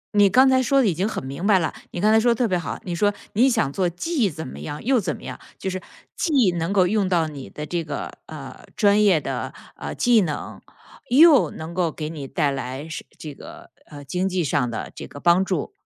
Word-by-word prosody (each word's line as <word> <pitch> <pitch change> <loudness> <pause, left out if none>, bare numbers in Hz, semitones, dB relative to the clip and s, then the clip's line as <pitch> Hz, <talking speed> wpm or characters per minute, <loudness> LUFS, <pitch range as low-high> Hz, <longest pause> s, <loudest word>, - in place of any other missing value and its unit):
你 205 -1 +6
刚 260 +5 +6
才 260 0 +4
说 275 +1 +3
得 260 - +4
已 180 - +2
经 185 +6 -1
很 175 - -5
明 140 +7 -5
白 205 -3 +6
了， 165 -3 -1 0.2
你 175 - -6
刚 215 +3 +3
才 220 - +6
说 240 +1 +3
得 - - -4
特 245 - +2
别 185 - 0
好。 175 - -5
你 175 - -4
说 205 +4 +2 0.2
你 250 +6 +4
想 165 - 0
做 185 -2 +1
既 230 - -1
怎 160 -2 -7
么 70 - -9
样 145 - -6
又 255 0 +3
怎 175 -7 -2
么 - - -14
样， - - -7 0.2
就 190 - -3
是， 185 0 -4 0.3
既 270 - +2
能 165 +2 -1
够 195 -2 +4
用 200 0 +1
到 170 -3 +2
你 140 -4 -8
的 150 - -7
这 170 +2 -2
个， 150 -2 -5 0.2
呃， - - -9
专 205 0 +4
业 190 -6 +5
的， - - -4 0.2
呃， - - -6
技 240 -3 +4
能， 155 -6 -4 0.5
又 295 +3 +6
能 160 +2 -8
够 175 -3 0
给 150 0 -5
你 145 -4 -7
带 145 +1 0
来 135 +2 -5
是 165 - -6
这 150 -2 -8
个， - - -13 0.2
呃， 145 -2 -10
经 180 +6 -1
济 180 -2 0
上 130 -3 0
的 115 - -5
这 - - -8
个 145 - -11
帮 175 +4 +4
助。 185 -6 -2
180 Hz, 260 characters per minute, -23 LUFS, 155-215 Hz, 0.5 s, 你